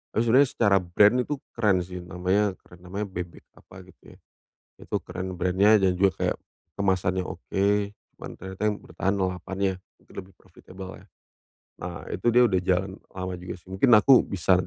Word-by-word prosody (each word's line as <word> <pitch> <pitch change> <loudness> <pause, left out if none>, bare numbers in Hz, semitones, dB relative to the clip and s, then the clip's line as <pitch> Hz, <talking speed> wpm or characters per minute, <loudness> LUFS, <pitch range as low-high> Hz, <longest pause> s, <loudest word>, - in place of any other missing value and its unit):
Terus 110 - +3
serius 135 +1 +5
secara 100 -4 +4
brand 100 +7 +4
itu 135 +4 -1 0.2
keren 100 -6 +2
sih 90 +1 -8
namanya 95 +3 0 0.2
namanya 90 +4 -5
bebek 90 -4 -7 0.2
apa 95 - -14
gitu 90 -1 -18
ya. - - -21 0.6
Itu - - -4
keren 95 0 -6
brand-nya 95 +4 +3
dan 90 -1 +2
juga 95 -1 +3
kayak - - 0 0.4
kemasannya 95 -2 0
oke, 95 +2 -3 0.5
cuman - - -9
ternyata 95 +1 -9
yang 105 - -3
bertahan 100 0 -2
lalapannya, 95 +1 -1 0.2
itu - - -24
lebih 95 0 -10
profitable 95 +1 -12
ya. - - -19 0.8
Nah, - - -6
itu 120 - 0
dia 120 +1 +5
udah 95 -5 +2
jalan 95 +1 0 0.2
lama 95 0 -5
juga 90 - -7
sih. 85 - -25
Mungkin 95 +8 +1
aku 130 +4 +6
bisa 95 -1 +1
95 Hz, 170 wpm, -26 LUFS, 90-100 Hz, 0.8 s, aku